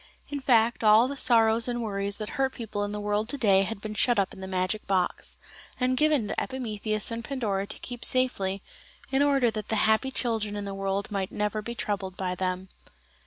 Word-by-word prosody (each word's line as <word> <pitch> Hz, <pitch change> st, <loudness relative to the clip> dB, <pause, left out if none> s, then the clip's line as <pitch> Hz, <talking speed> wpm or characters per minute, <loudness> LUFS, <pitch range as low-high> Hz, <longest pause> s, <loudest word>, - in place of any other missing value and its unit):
In 285 Hz, -, -3 dB
fact 235 Hz, -3 st, +3 dB
all 215 Hz, +3 st, +6 dB
the 280 Hz, -, -4 dB
sorrows 225 Hz, -3 st, +4 dB
and 240 Hz, -1 st, -2 dB
worries 200 Hz, -1 st, -2 dB
that 215 Hz, -1 st, -5 dB
hurt 270 Hz, -2 st, 0 dB
people 210 Hz, -3 st, -4 dB
in 205 Hz, -, -3 dB
the 210 Hz, -, -4 dB
world 210 Hz, +2 st, -1 dB
to 285 Hz, -, +1 dB
day 200 Hz, -7 st, +4 dB
had 195 Hz, +2 st, -3 dB
been 215 Hz, 0 st, -5 dB
shut 240 Hz, +3 st, +2 dB
up 195 Hz, -1 st, +1 dB
in -, -, -11 dB
the 190 Hz, -, -6 dB
magic 185 Hz, +3 st, -2 dB
box, 185 Hz, -2 st, -1 dB, 0.4 s
and 255 Hz, 0 st, +2 dB
given 300 Hz, -5 st, +2 dB
to -, -, -2 dB
Epimetheus 215 Hz, -4 st, -2 dB
and 230 Hz, 0 st, -4 dB
Pandora 215 Hz, -6 st, -2 dB
to -, -, -6 dB
keep 245 Hz, -1 st, -7 dB
safely, 200 Hz, -7 st, +1 dB, 0.5 s
in 270 Hz, +1 st, +2 dB
order 275 Hz, -5 st, +3 dB
that 215 Hz, -1 st, -5 dB
the 220 Hz, -, -1 dB
happy 220 Hz, +4 st, +3 dB
children 225 Hz, -5 st, -1 dB
in 205 Hz, -1 st, -4 dB
the 200 Hz, -, -4 dB
world 195 Hz, +1 st, -2 dB
might 195 Hz, -2 st, -2 dB
never 210 Hz, +1 st, -1 dB
be 235 Hz, +2 st, -6 dB
troubled 195 Hz, -4 st, -3 dB
by 185 Hz, -1 st, -2 dB
them. 185 Hz, +1 st, -3 dB
215 Hz, 215 wpm, -27 LUFS, 200-240 Hz, 0.5 s, all